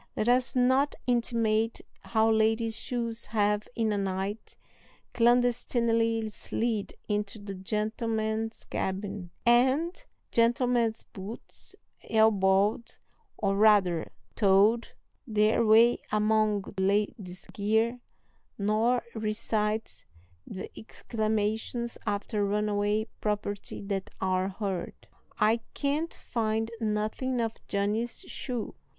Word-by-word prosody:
Let 215 - 0
us 250 +1 +2
not 260 +3 +3
intimate 230 -2 +1 0.2
how 220 -1 +2
ladies' 220 +1 +2
shoes 235 -2 -3
have, 210 -1 +1
in 225 -2 +1
a 205 - 0
night, 195 +2 -3 0.6
clandestinely 230 -2 +2
slid 220 0 -2
into 210 0 -2
the 205 -1 -7
gentlemen's 220 +3 -2
cabin, 190 -1 -3 0.2
and 260 +9 +3 0.3
gentlemen's 235 -1 +2
boots 200 +4 -9 0.3
elbowed, 210 0 +3 0.4
or, 195 -1 0
rather, 200 -5 +4 0.2
toed 210 +3 +4 0.4
their 215 +1 +3
way 225 +2 +6
among 215 -1 +2 0.2
ladies' 195 -2 -1
gear, 220 +4 +1 0.6
nor 220 +4 +2
recite 215 0 -2 0.4
the 190 - -7
exclamations 220 +1 -2
after 205 +1 -1
runaway 210 +1 +1
property 205 -1 -3
that 195 -1 -3
are 185 0 0
heard. 195 -3 -4 0.4
"I 215 +2 +4 0.2
can't 300 +4 -1
find 225 -1 -2
nothing 220 +4 -1
of 225 -1 0
Johnny's 210 +4 -1
shoe!" 245 -4 -5
220 Hz, 95 wpm, -29 LUFS, 205-230 Hz, 0.6 s, way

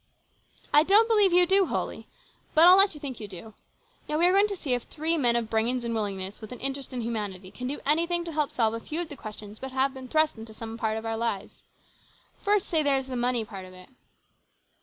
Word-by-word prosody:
" - - -40 0.3
I 295 - +8
don't 410 +7 +5
believe 420 -4 +4
you 355 +1 +5
do 385 +1 +4
wholly. - - -4 0.5
But 320 +2 +7
I'll 360 +1 +9
let 390 -3 +5
you - - -9
think 270 -4 -6
you 210 - -6
do. 200 +3 -10 0.6
Now, 300 - 0
we 340 - +3
are 360 - +5
going 400 +2 +4
to 405 - -4
see 290 -8 -3
if 245 - 0
three 320 +5 -1
men 245 -7 +3
of 235 -2 -1
brains 230 +3 0
and 235 0 -3
willingness, 200 -2 -3
with 215 - -10
an 250 - -8
interest 275 0 -2
in 250 -2 -4
humanity, 205 -5 -4
can 250 - -6
do 285 +3 -4
anything 340 +4 +2
to 335 - -5
help 300 -2 0
solve 225 -2 +1
a 230 - -4
few 305 +7 -3
of 340 - -5
the 290 - -7
questions 210 -3 -9
that 265 0 -7
have 265 +1 +1
been 260 -1 -9
thrust 310 -4 +1
into 220 -1 -11
some 225 0 -7
of 225 - -10
our 220 0 0
own 225 0 -4
lives. 220 -4 -3 0.8
First, 410 -1 +1
say, 320 -2 +1
there 285 -2 +2
is 265 - -3
the 260 -1 -6
money 245 -2 0
part 195 -3 -9
of 185 - -13
it." 185 0 -14
255 Hz, 250 wpm, -26 LUFS, 220-320 Hz, 0.8 s, I'll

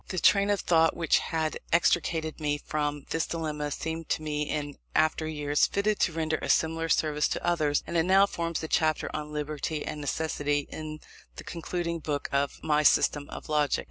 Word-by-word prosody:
The 185 - -5
train 200 +3 +4
of 205 -1 +1
thought 165 -1 +3
which 165 -2 +3
had 160 -2 -2
extricated 165 -2 +1
me 150 -1 0
from 145 -1 -3
this 165 - 0
dilemma 150 -3 -3
seemed 160 +2 -4
to 155 - 0
me, 150 -1 -2
in 145 -2 -3 0.2
after 155 0 +2
years, 150 -2 +1
fitted 205 +1 0
to - - +2
render 160 -1 -1
a - - -4
similar 165 0 +1
service 150 -2 +2
to - - -3
others; 155 -4 +1
and - - -6
it 165 - +5
now 190 +2 +6
forms 170 -4 -3
the 160 - -4
chapter 155 -1 +1
on 150 0 -5
Liberty 150 0 -3
and 150 - -5
Necessity 145 -1 -1
in 155 -1 -6 0.3
the - - -8
concluding 170 0 -3
Book 150 -2 -3
of 140 0 0
my 150 -1 +2
System 145 -1 +3
of - - -8
Logic. 150 -2 +2
155 Hz, 190 wpm, -28 LUFS, 150-165 Hz, 0.3 s, now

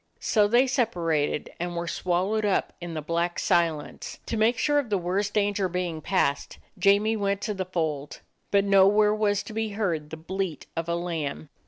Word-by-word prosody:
So 210 -3 +3
they 240 +5 +4
separated, 170 - 0
and 175 0 -3
were 170 0 -3
swallowed 185 +6 0
up 205 -2 +1
in 170 -1 -6
the 155 - -4
black 170 +2 -1
silence. 170 -5 0
To - - -3
make 225 +2 +3
sure 290 +3 +2
of 265 -6 -3
the 205 - +2
worst 190 +3 -1
danger 205 -2 +1
being 175 -3 -3
passed, 145 -5 0 0.2
Jamie 200 +4 +4
went 200 -2 0
to 215 - -2
the 190 -2 -3
fold, 155 -5 -3 0.3
but 200 -1 +3
nowhere 200 +2 +5
was 210 -1 +1
to - - -9
be 220 -1 -2
heard 170 -8 -2
the 160 - -7
bleat 180 -1 -4
of 165 0 -3
a 170 - +1
lamb. 160 -4 -4
190 Hz, 185 wpm, -26 LUFS, 170-210 Hz, 0.3 s, nowhere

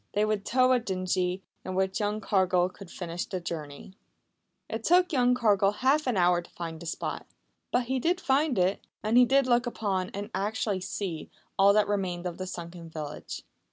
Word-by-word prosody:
They 210 +1 +2
would 215 -2 -1
tow 255 +1 +3
a 255 - +4
dinghy, 185 -2 -1 0.2
in 185 - -4
which 190 +1 0
young 210 0 -1
Cargill 185 -3 +2
could 190 -1 -12
finish 175 -1 -5
the 185 - -3
journey. 155 -1 -7 0.7
It 225 0 -4
took 360 +3 +4
young 250 -2 +4
Cargill 205 -4 +3
half 270 +6 +2
an 245 -5 +1
hour 175 -1 +4
to 175 - -16
find 165 -2 -6
the 170 - -8
spot. - - -4 0.4
But 245 - +2
he 260 +2 -1
did 350 +7 +1
find 275 - +2
it, 185 +2 +1 0.2
and 215 +2 +1
he 250 0 +8
did 275 +2 +3
look 245 0 +2
upon, 195 -6 -1
and 205 +3 -6
actually 200 0 -1
see, 180 -4 -4 0.3
all 200 0 +6
that 210 0 +3
remained 185 -4 -2
of 175 -1 -4
the 185 - -4
sunken 170 -1 -7
village. 150 -2 -6
195 Hz, 190 wpm, -28 LUFS, 180-240 Hz, 0.7 s, he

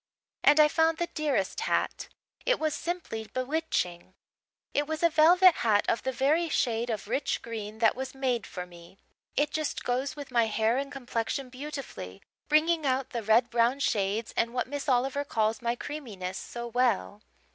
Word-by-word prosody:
And 295 +1 +6
I 305 - +8
found 320 +1 +2
the 345 0 -2
dearest 285 -11 0
hat - - -1 0.4
it - - +2
was 310 -1 0
simply 325 -11 -4
bewitching. 255 - -2 0.6
It 290 0 +1
was 315 +1 -3
a 335 - +5
velvet 350 +3 +6
hat, 210 -3 +2
of 230 - +1
the 260 - -1
very 300 +6 +1
shade 235 -4 0
of 215 -3 -3
rich 265 +5 -1
green 220 -2 -6
that 225 -1 +3
was 265 +1 -5
made 255 -4 -1
for 180 -1 -6
me. 175 +1 -15 0.4
It 295 0 +1
just 310 -1 -2
goes 255 +3 -1
with 285 -3 -8
my 235 -2 +3
hair 220 +2 +1
and 275 0 -4
complexion 255 0 -3
beautifully, 260 - -7 0.3
bringing 315 +2 +3
out 265 -1 0
the 235 - -2
red 220 +3 +3
brown 240 +3 +2
shades 210 -3 0
and 235 +1 0
what 250 - 0
Miss 285 +1 -4
Oliver 265 +3 +1
calls 220 -4 0
my 235 0 0
'creaminess' 220 -11 -6
so 240 0 -6
well. 235 -4 0
255 Hz, 175 wpm, -28 LUFS, 225-295 Hz, 0.6 s, I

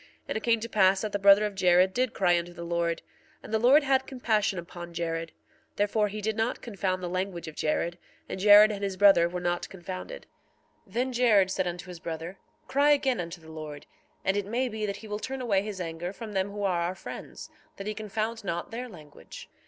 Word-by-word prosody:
1:35 - - -24 0.2
And - - -1
it - - -21
came 230 -1 +3
to 230 - -3
pass 195 -3 +3
that 215 - -3
the 205 - -1
brother 200 +1 +7
of 210 - -3
Jared 185 0 +4
did 255 +3 0
cry 180 -3 +3
unto 175 0 -2
the 170 - -8
Lord, 170 0 -1 0.4
and - - -9
the 220 - +3
Lord 265 +6 +6
had 265 -1 +2
compassion 220 -6 0
upon 175 0 -8
Jared; 165 -1 -3 0.4
therefore 210 +1 +1
he 210 +1 -6
did 220 +1 -1
not 225 +2 -1
confound 190 -4 -3
the - - -2
language 185 -1 -3
of 160 - -7
Jared; 170 +3 -1 0.3
and - - -5
Jared 210 +2 +8
and 205 -1 -5
his 195 -1 -2
brother 195 -4 +6
were 180 +1 -4
not 175 0 -2
confounded. 190 - -7 0.6
1:36 190 - -20
Then 250 +3 0
Jared 215 -6 +4
said 185 -1 0
unto 175 +1 -5
his 180 -2 -9
brother: 165 +3 -6 0.3
Cry 285 +2 +3
again 270 -4 +3
unto 170 0 -5
the 160 0 -13
Lord, 155 -2 -8 0.4
and 190 - +2
it 205 -1 -1
may 245 +4 0
be 215 -1 -3
that 200 -1 -3
he 220 - -11
will 210 0 -4
turn 265 +4 -5
away 215 -6 +1
his 205 -2 -6
anger 170 0 -4
from 215 +1 -8
them 190 0 0
who 205 0 -5
are 180 -3 +1
our 175 +2 -1
friends, - - -9 0.3
that 195 - -7
he 215 - -2
confound 215 +2 -3
not 170 -3 -3
their 245 +2 -5
language. 150 - -12
195 Hz, 230 wpm, -28 LUFS, 175-220 Hz, 0.6 s, Jared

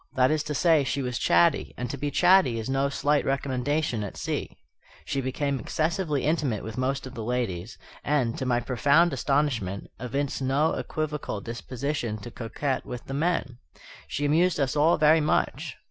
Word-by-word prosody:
That 130 +1 +4
is 155 -1 +1
to 150 0 -3
say, 160 -1 +4
she 135 +1 -1
was 125 -1 -2
chatty; 85 0 +3
and 125 - -3
to - - -3
be 145 +2 -2
chatty 180 -7 +4
is 110 - -4
no 135 +1 +1
slight 145 +1 +1
recommendation 135 -2 -1
at 100 - -7
sea. - - -4 0.5
She 135 - -1
became 135 +1 -1
excessively 155 - -1
intimate 145 - 0
with 110 -1 -6
most 130 +2 -1
of 130 - -8
the 115 - -5
ladies; 115 -3 -3 0.3
and, 130 -5 +1
to - - -2
my 120 -1 +2
profound 145 +7 +3
astonishment, 130 -8 -1
evinced 135 +4 -2
no 140 +4 +2
equivocal 150 -8 -3
disposition 120 +1 -4
to 120 +3 -9
coquet 130 +4 -3
with 125 0 -7
the 135 - -6
men. 145 -5 -1 0.5
She 145 - -2
amused 165 +3 +3
us 135 0 0
all 155 +3 +4
very 155 +1 +5
much. 150 - 0
135 Hz, 175 wpm, -26 LUFS, 125-150 Hz, 0.5 s, very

